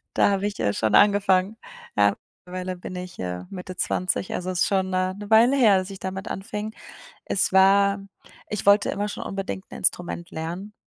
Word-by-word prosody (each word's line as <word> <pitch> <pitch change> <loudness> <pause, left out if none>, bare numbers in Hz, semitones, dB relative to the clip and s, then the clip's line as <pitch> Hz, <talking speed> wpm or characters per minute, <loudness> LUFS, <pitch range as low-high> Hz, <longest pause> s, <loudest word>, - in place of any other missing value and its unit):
da - - +4
habe 200 0 0
ich, 205 -1 -4
äh, 100 - +1
schon 110 +1 0
angefangen. 200 0 +4 0.4
Ja, 100 0 +4 0.3
mittlerweile 185 0 -5
bin 180 - -7
ich, 180 -1 -8
äh, 90 0 -4
Mitte 185 -1 -8
20, 185 0 -1
also 180 +1 -3
es 180 -2 -2
ist - - +4
schon 190 -1 +1
'ne 185 0 0
'ne 205 0 -8
Weile 230 +4 +6
her, 215 -7 +5
dass 185 +1 -2
ich 195 - -8
damit 190 +1 -5
anfing. 210 +2 -5 0.5
Es 190 - 0
war 200 +1 +5 0.5
ich 210 - -4
wollte 200 +1 +5
immer 205 +1 -2
schon 210 - -6
unbedingt 195 -1 -4
'n - - -7
Instrument 175 -1 -1
lernen, 175 +6 -6
190 Hz, 195 wpm, -24 LUFS, 180-200 Hz, 0.5 s, Weile